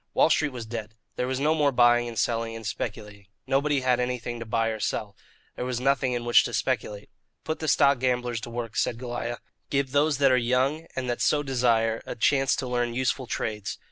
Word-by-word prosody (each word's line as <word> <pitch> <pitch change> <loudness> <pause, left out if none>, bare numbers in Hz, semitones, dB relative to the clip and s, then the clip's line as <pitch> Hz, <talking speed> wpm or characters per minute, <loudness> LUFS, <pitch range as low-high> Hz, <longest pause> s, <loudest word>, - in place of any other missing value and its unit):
Wall 160 - +4
Street 150 -1 +2
was 120 -3 -6
dead. 110 -1 -6 0.2
There 125 - -1
was 130 0 -2
no 150 +3 +3
more 150 -3 +2
buying 120 -1 +4
and 115 -1 -7
selling 115 +1 -1
and 115 -1 -8
speculating. 105 -1 -5 0.2
Nobody 140 +1 +1
had 125 -1 +2
anything 125 -1 -3
to 115 - -7
buy 115 +1 +1
or 110 -1 -4
sell. 105 -1 -3 0.4
There - - -4
was 125 -1 -2
nothing 135 -1 +1
in 120 -1 -3
which 120 - +6
to - - -3
speculate. 105 -1 -2 0.3
"Put 160 - -3
the 155 - -3
stock 140 -2 +4
gamblers 125 -2 0
to 120 - -7
work," 115 -1 -5
said 115 - 0
Goliah; 120 -1 -4 0.3
"give 140 -2 0
those 145 +1 +2
that 140 -2 +4
are 130 - +4
young, 130 +6 +1
and 130 -1 -3
that 120 -1 -2
so 145 -1 +2
desire, 115 -4 +1
a - - -4
chance 135 +3 +2
to 130 - -4
learn 120 -1 -1
useful 130 0 -1
trades." 105 -4 -3
125 Hz, 215 wpm, -26 LUFS, 115-135 Hz, 0.4 s, which